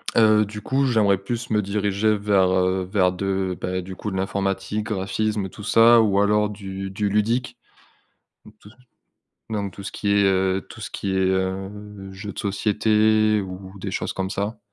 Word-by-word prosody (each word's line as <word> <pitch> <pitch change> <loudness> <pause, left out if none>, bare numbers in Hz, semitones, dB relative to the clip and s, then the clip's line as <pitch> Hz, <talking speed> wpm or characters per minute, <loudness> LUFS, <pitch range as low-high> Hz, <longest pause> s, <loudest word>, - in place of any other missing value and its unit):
Heu, 110 -1 +5
du 105 +1 -8
coup, 135 +1 +1
j'aimerais 105 -5 +3
plus 115 +4 -5
me 105 -1 +3
diriger 105 +1 0
vers, 100 -2 +2
heu, 95 0 +1
vers 95 -3 +3
de 95 -1 -2
bah, 95 0 -2
du 95 +1 -8
coup, 105 +2 -5
de 95 - -3
l'informatique, 100 +2 -2
graphisme 105 0 -1
tout 105 - -11
ça. 115 +2 +6
Ou 100 -3 +2
alors 105 +1 +3
du 95 -1 -6
du 105 +1 -1
ludique, 115 +4 0 0.9
ou - - -14
tout 105 - -15
ce - - -21 0.7
donc 100 -3 -3
tout 100 - -10
ce 100 - -6
qui 100 - -2
est, 100 0 +4
heu 95 0 +2
tout - - -12
ce - - -6
qui 100 - -4
est, - - +2
heu, 95 +1 0 0.4
jeux 100 +2 -7
de - - -13
société 110 +1 +2
ou 95 0 -8
des - - -5
choses - - -2
comme 95 0 -3
ça. 105 +2 -3
100 Hz, 185 wpm, -23 LUFS, 95-105 Hz, 0.9 s, ça